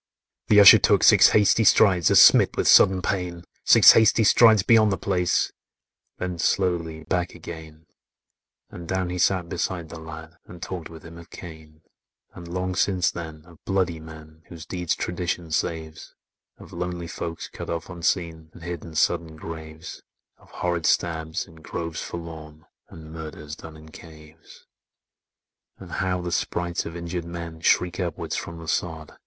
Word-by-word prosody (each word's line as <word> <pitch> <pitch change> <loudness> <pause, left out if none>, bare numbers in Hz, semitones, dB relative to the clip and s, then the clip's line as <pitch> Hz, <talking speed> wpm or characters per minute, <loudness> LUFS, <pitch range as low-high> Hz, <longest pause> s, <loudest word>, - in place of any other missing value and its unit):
'" - - -65
The 105 - +5
Usher 100 - +10
took - - +2
six - - +7
hasty 105 +1 +3
strides, 95 -6 +4
As - - +5
smit - - +6
with - - 0
sudden 95 -1 +5
pain,— 90 -3 -3 0.2
Six - - +8
hasty 110 0 +4
strides 110 -1 +5
beyond 110 -2 +4
the 95 - -1
place, 90 -3 0 0.7
Then 90 -2 -5
slowly 85 -4 -1
back 90 +2 -3
again; 80 -1 -11 0.9
And 85 -1 -10
down 95 -1 -2
he 90 - -4
sat 90 0 +1
beside 85 -1 -4
the 85 - -9
lad, 80 +1 -11
And 90 - -12
talked 85 -1 -7
with 80 -1 -13
him 85 0 -11
of 85 - -15
Cain; 80 -2 -12 0.5
And, 85 -1 -11
long 90 +1 -3
since 90 0 0
then, 80 -2 -9
of 85 -2 -19
bloody 95 -4 -1
men, 80 0 -13
Whose 80 -2 -11
deeds 90 -2 -3
tradition 85 -2 -4
saves; 80 0 -4 0.4
Of - - -15
lonely 90 0 -5
folks 85 0 -6
cut - - -9
off 85 -1 -4
unseen, 85 -2 -3
And 85 - -14
hid 85 -2 -6
in 80 -2 -11
sudden 80 0 0
graves; 80 0 -9 0.4
Of - - -23
horrid 85 -2 -2
stabs, 80 -2 -1
in 80 -3 -18
groves 85 +1 -6
forlorn, 80 -2 -9 0.2
And 80 -1 -12
murders 75 -2 -8
done 80 0 -12
in 80 0 -15
caves; 80 0 -16 1.1
And - - -12
how 90 -1 -2
the 90 0 -5
sprites 85 0 -2
of 85 - -9
injured 85 0 -5
men 85 -1 -8
Shriek 90 +2 +1
upward 90 -2 -4
from 85 - -5
the 80 -1 -11
sod. 80 -1 -3
85 Hz, 165 wpm, -24 LUFS, 80-90 Hz, 1.1 s, Usher